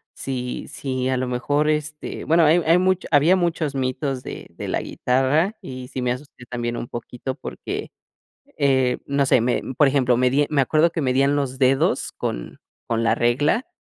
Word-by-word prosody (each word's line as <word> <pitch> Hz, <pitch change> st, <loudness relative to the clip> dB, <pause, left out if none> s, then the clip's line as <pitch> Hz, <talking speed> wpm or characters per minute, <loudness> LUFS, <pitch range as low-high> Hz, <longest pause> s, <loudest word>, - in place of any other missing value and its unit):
si 125 Hz, -2 st, -4 dB
si 130 Hz, -3 st, -3 dB
a 130 Hz, -, +1 dB
lo 130 Hz, -, -1 dB
mejor, 145 Hz, +5 st, 0 dB
este, 150 Hz, 0 st, -3 dB
bueno, 165 Hz, +1 st, +4 dB
hay 165 Hz, +3 st, +5 dB
hay 165 Hz, +2 st, +5 dB
mucho 185 Hz, 0 st, +1 dB
había 155 Hz, +6 st, +5 dB
muchos 165 Hz, -5 st, -1 dB
mitos 130 Hz, 0 st, -2 dB
de -, -, -8 dB
de -, -, -5 dB
la -, -, 0 dB
guitarra, 145 Hz, -, +1 dB
y 130 Hz, -6 st, -8 dB
sí 130 Hz, -, -4 dB
me 125 Hz, 0 st, +1 dB
asusté, 125 Hz, -1 st, -11 dB
también 120 Hz, -1 st, -3 dB
un 120 Hz, -, -5 dB
poquito 125 Hz, +2 st, -6 dB
porque, -, -, -6 dB, 0.7 s
eh, 130 Hz, -3 st, +2 dB
no 140 Hz, 0 st, +1 dB
sé, 125 Hz, -, +4 dB
me 120 Hz, +1 st, +1 dB, 0.2 s
por 145 Hz, -, +6 dB
ejemplo, 130 Hz, -3 st, +2 dB
medi 130 Hz, +3 st, +3 dB
me 140 Hz, -2 st, +3 dB
acuerdo 155 Hz, +5 st, +3 dB
que 165 Hz, -, -2 dB
medían 135 Hz, +1 st, +2 dB
los 135 Hz, -2 st, -2 dB
dedos 135 Hz, 0 st, +2 dB
con -, -, -5 dB, 0.3 s
con 115 Hz, 0 st, 0 dB
la -, -, +3 dB
regla, 145 Hz, -, +1 dB
135 Hz, 180 wpm, -22 LUFS, 125-150 Hz, 0.7 s, por